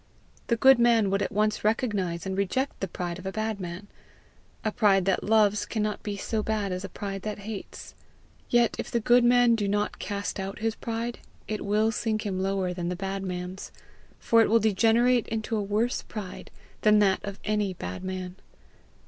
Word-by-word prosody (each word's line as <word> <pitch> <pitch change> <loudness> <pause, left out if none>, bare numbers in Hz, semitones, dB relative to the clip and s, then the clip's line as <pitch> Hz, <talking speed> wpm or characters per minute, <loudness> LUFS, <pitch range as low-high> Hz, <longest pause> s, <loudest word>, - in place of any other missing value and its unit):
The 235 - +2
good 265 +2 +6
man 230 -4 +4
would 195 0 +1
at - - -1
once 215 +1 0
recognize 205 -6 0
and 190 0 -2
reject 200 +8 -1
the 195 - -2
pride 175 0 -5
of 190 - -7
a - - -2
bad 215 0 -2
man. 180 +2 -6 0.8
A 215 - +1
pride 195 -4 +3
that 195 - +1
loves 210 -1 +3
cannot 210 -2 -2
be 205 -1 -4
so 220 +2 -2
bad 210 -2 -1
as 180 +1 -3
a 195 - -5
pride 195 +1 -5
that 210 +2 -4
hates. 215 -3 -7 0.6
Yet 240 -1 +3
if - - -4
the 235 - 0
good 240 +2 +4
man 245 0 +5
do 210 -3 0
not 205 +1 -1
cast 205 -1 -4
out 195 +1 -4
his 225 +1 -1
pride, 230 +1 -4 0.3
it 215 -1 -3
will 215 +2 +2
sink 215 -1 -2
him 190 -2 -2
lower 190 -1 0
than 175 -1 -3
the 180 - -2
bad 195 +1 -4
man's, 180 0 -5 0.5
for 230 0 +4
it - - +3
will 230 +1 +5
degenerate 225 +3 +3
into 225 0 -2
a 215 - 0
worse 210 +5 0
pride 200 -4 -8 0.3
than 215 -1 +5
that 200 -2 +3
of 200 -1 -5
any 210 -3 0
bad 90 - -6
man. 185 -1 -5
210 Hz, 195 wpm, -27 LUFS, 190-225 Hz, 0.8 s, good